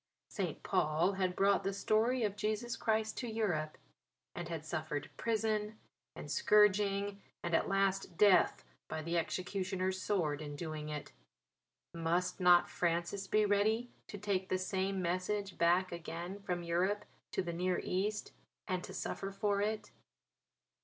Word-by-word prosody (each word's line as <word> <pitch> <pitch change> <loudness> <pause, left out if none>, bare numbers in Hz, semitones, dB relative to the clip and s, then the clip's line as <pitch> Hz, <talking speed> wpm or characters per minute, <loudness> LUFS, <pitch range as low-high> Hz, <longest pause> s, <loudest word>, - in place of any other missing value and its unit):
St. - - -3
Paul 155 +5 +2
had 185 -2 -1
brought 200 +1 +3
the 195 - 0
story 225 +5 +2
of 205 -2 0
Jesus 215 +3 -1
Christ 220 -1 0
to 245 - -3
Europe; 175 -9 -1 0.6
and 175 -1 -5
had 160 -2 -4
suffered 155 -2 -3
prison 215 -1 0 0.4
and - - -7
scourging 205 -1 +3 0.2
and 175 - -2
at - - +3
last 195 -2 0
death 200 - +5 0.2
by 155 - -4
the 170 +2 -2
executioner's 185 +2 -1
sword 160 -8 0
in 145 -1 -6
doing 155 -1 -5
it; 150 -1 -5 0.8
must 170 +3 0
not 180 -1 +6
Francis 175 +3 -1
be 215 +1 +3
ready 215 +4 +2 0.2
to 205 - -7
take 190 -2 -1
the 185 - +2
same 190 0 -1
message 185 +3 -1
back 175 +2 +3
again 170 +3 -5
from 180 -3 -3
Europe 180 +5 0 0.3
to - - 0
the 170 -1 -3
Near 180 +2 0
East 210 +3 -1 0.4
and 185 -2 -1
to - - -8
suffer 195 - -3
for 200 0 0
it? 215 +1 -2
190 Hz, 145 wpm, -34 LUFS, 170-205 Hz, 0.8 s, not